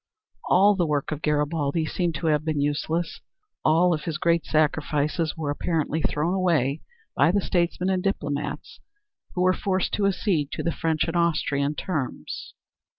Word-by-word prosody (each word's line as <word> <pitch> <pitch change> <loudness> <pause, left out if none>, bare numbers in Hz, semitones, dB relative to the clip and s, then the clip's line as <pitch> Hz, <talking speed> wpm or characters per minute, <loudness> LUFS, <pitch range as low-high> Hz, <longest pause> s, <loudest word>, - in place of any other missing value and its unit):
All 200 +3 +6
the 175 -3 +1
work 145 -1 -1
of 155 -1 -4
Garibaldi 150 +1 0
seemed 170 0 -1
to 165 - -4
have 150 -2 +2
been 155 -2 -1
useless. 155 +4 -1 0.4
All 170 +3 +4
of 155 - -3
his 165 -3 -2
great 170 0 +1
sacrifices 155 +1 0
were 150 -3 -2
apparently 160 0 -1
thrown 155 +4 0
away 165 -7 +1 0.3
by 170 - +4
the 200 - +2
statesmen 180 0 0
and 185 -1 0
diplomats 150 -7 -3 0.6
who 180 - +1
were 185 0 +4
forced 185 0 -1
to 200 -1 +2
accede 180 -7 0
to - - -3
the 170 - +1
French 160 -1 0
and 165 - -3
Austrian 150 -4 +1
terms. 150 -6 -4
160 Hz, 160 wpm, -25 LUFS, 150-180 Hz, 0.6 s, All